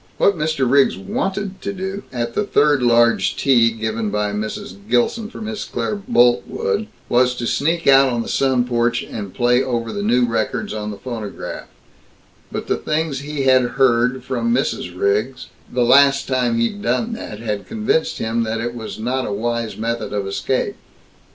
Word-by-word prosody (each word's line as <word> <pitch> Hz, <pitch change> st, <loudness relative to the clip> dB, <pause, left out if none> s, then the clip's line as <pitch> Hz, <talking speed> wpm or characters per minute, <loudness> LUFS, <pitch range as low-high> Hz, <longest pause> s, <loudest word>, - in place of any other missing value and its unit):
What 200 Hz, -, +3 dB
Mr. 155 Hz, -4 st, 0 dB
Riggs 135 Hz, -8 st, +4 dB
wanted 190 Hz, -, -3 dB
to -, -, -3 dB
do, 190 Hz, +1 st, -5 dB
at 120 Hz, -2 st, -3 dB
the 210 Hz, -, 0 dB
third 145 Hz, -8 st, +3 dB
large 120 Hz, -1 st, +3 dB
tea 120 Hz, -4 st, +4 dB
given 110 Hz, -1 st, -3 dB
by 105 Hz, 0 st, -1 dB
Mrs. 105 Hz, -2 st, -5 dB
Gilson 170 Hz, -, +1 dB
for 230 Hz, -, -10 dB
Miss 215 Hz, -1 st, -4 dB
Claire -, -, -3 dB
Boltwood, 195 Hz, -, +1 dB, 0.2 s
was 125 Hz, +1 st, +3 dB
to 120 Hz, -, -4 dB
sneak 165 Hz, +7 st, 0 dB
out 135 Hz, 0 st, +6 dB
on 120 Hz, -1 st, -1 dB
the -, -, -9 dB
sun 130 Hz, -2 st, +1 dB
porch 120 Hz, -1 st, 0 dB
and 100 Hz, -4 st, -6 dB
play 125 Hz, +1 st, +3 dB
over 120 Hz, -3 st, -2 dB
the 205 Hz, -, -3 dB
new 125 Hz, -11 st, +3 dB
records 115 Hz, -2 st, -2 dB
on 105 Hz, -1 st, -4 dB
the 105 Hz, -, -6 dB
phonograph; 110 Hz, -3 st, -6 dB, 0.8 s
but -, -, -4 dB
the -, -, 0 dB
things 155 Hz, -3 st, -1 dB
he 145 Hz, 0 st, -4 dB
had 130 Hz, -1 st, +5 dB, 0.2 s
heard 125 Hz, -1 st, +3 dB
from 120 Hz, -3 st, -1 dB
Mrs. 90 Hz, -8 st, -1 dB
Riggs 105 Hz, +6 st, 0 dB, 0.2 s
the 125 Hz, 0 st, +1 dB
last 140 Hz, +2 st, +5 dB
time 125 Hz, -3 st, +1 dB
he'd 115 Hz, -, -1 dB
done 225 Hz, +2 st, 0 dB
that 165 Hz, -, -7 dB
had 105 Hz, -2 st, -4 dB
convinced 215 Hz, -7 st, 0 dB
him 115 Hz, +1 st, -1 dB
that 110 Hz, 0 st, -2 dB
it 120 Hz, +1 st, -3 dB
was 115 Hz, -2 st, -7 dB
not 125 Hz, +4 st, -2 dB
a -, -, -3 dB
wise 115 Hz, +2 st, -2 dB
method 115 Hz, 0 st, -3 dB
of 100 Hz, -1 st, -1 dB
escape. 110 Hz, +6 st, -2 dB
125 Hz, 175 wpm, -20 LUFS, 115-140 Hz, 0.8 s, out